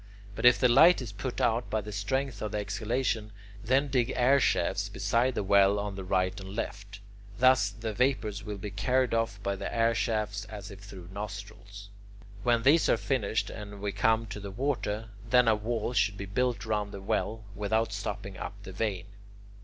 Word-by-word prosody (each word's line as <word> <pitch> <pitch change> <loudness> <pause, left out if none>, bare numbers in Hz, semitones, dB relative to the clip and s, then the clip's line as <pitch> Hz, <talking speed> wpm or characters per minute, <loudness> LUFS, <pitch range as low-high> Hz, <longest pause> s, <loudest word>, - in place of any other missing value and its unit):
But 120 - +3
if 125 - +7
the 125 - +5
light 165 +9 +7
is 125 -5 -6
put 120 +5 -5
out 120 +1 +1
by 110 - 0
the 105 0 -7
strength 120 +4 -2
of 105 -1 -4
the - - 0
exhalation, 110 +2 -1 0.3
then 135 +5 +2
dig 130 -2 +1
air 130 +3 +4
shafts - - +1
beside 120 +2 +1
the - - -1
well 100 +1 +4
on 100 0 -3
the 95 -1 -6
right 95 0 0
and 95 +1 -8
left. 100 -2 -5 0.4
Thus 130 -4 +5
the 110 +2 -5
vapours 110 -3 0
will 105 -1 -5
be 100 +1 -6
carried 125 +5 +1
off 115 -3 0
by 100 0 -1
the - - -5
air 115 0 +2
shafts 105 -3 -1
as 105 -2 -9
if 100 - -10
through 95 -3 -11
nostrils. 100 0 -8 0.5
When 120 0 +2
these 155 +6 +5
are - - +4
finished 115 -5 -1
and 105 -2 -8
we 100 0 -2
come 110 +3 +2
to 105 -1 -7
the 100 0 -7
water, 115 -2 -2 0.2
then 125 0 +5
a 110 - +6
wall 110 +2 -2
should 100 -2 +1
be 100 - -5
built 115 +1 -1
round 105 -2 -2
the 100 - -6
well 110 +2 -1
without 105 +2 0
stopping 100 -1 -5
up - - -5
the 95 - -8
vein. 95 -2 -2
105 Hz, 195 wpm, -29 LUFS, 100-120 Hz, 0.5 s, if